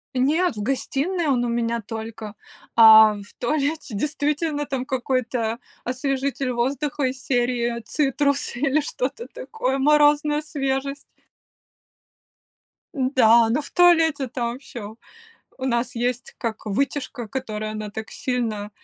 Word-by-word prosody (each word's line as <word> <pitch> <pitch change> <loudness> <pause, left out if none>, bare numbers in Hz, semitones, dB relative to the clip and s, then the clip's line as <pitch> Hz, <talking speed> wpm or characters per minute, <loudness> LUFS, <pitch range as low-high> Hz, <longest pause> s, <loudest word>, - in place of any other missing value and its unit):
Нет, 305 +5 +2
в 210 - -5
гостиной 290 - -1
он 250 -3 +2
у 240 - -1
меня 235 0 -1
только. 220 0 -7 0.4
А 220 -1 +9
в 200 0 -11
туалете 285 0 -1
действительно 295 +3 -1
там 265 -3 -3
какой-то 245 -3 -1 0.2
освежитель 270 +1 -2
воздуха 275 +4 -1
из 260 0 -2
серии 240 -2 0
"Цитрусы" 280 -1 0
или 280 +1 +2
что-то 285 - -4
такое, 445 - -3
"Морозная 295 +1 +4
свежесть". 275 -2 -3 1.9
Да, 235 -4 +4
но 250 +6 +1
в 285 - -10
туалете 325 -6 +4
там 240 +1 -3
всё 220 -6 -9 0.6
у 260 - -5
нас 245 -1 -1
есть 245 +1 -2
как 225 -2 -4
вытяжка, 255 +2 -2
которая 215 -4 -4
она 215 -1 -5
так 220 +1 -7
сильно, 225 -5 -3
255 Hz, 120 wpm, -23 LUFS, 235-285 Hz, 1.9 s, А